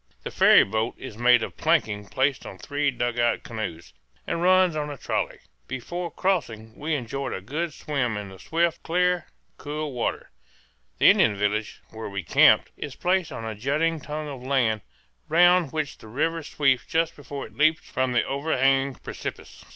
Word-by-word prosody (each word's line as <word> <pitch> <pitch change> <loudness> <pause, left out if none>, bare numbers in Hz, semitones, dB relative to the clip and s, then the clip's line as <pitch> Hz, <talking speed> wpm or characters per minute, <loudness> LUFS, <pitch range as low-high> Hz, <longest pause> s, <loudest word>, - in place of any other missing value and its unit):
The - - -5
ferry - - +7
boat 110 +3 -2
is 130 - -9
made 120 0 +4
of - - -6
planking 110 -11 +1
placed 135 +3 0
on 95 - -9
three 145 +8 -1
dugout 120 -2 0
canoes, 100 -8 -6 0.3
and 170 - -2
runs 185 -1 +4
on 150 -1 -2
a 145 - -6
trolley. - - -2 0.3
Before 170 +8 -4
crossing 115 - -2
we 155 +1 -2
enjoyed 135 +1 -4
a - - -3
good 155 - -3
swim 135 -6 -2
in 100 -1 -6
the 95 -1 -13
swift, 170 0 0
clear, 180 +1 +1 0.3
cool 150 0 -4
water. 120 - -3 0.7
The - - +7
Indian 105 - +3
village, 105 +2 -2
where 110 -1 -7
we 100 -2 -4
camped, 80 - +5
is 145 -3 -7
placed 180 -2 0
on 115 -4 -6
a 110 - -3
jutting 150 +9 0
tongue 150 +1 -5
of 135 -3 -7
land 125 -5 +1 0.5
round 175 -1 +5
which 155 -3 -3
the - - -13
river 165 +8 -1
sweeps 135 -4 +1
just 165 0 0
before 140 -1 -7
it - - -15
leaps 155 +2 +2
from 130 -1 -1
the 120 - +3
over 140 +3 -2
hanging 135 0 +2
precipice. - - -8
140 Hz, 175 wpm, -25 LUFS, 115-160 Hz, 0.7 s, ferry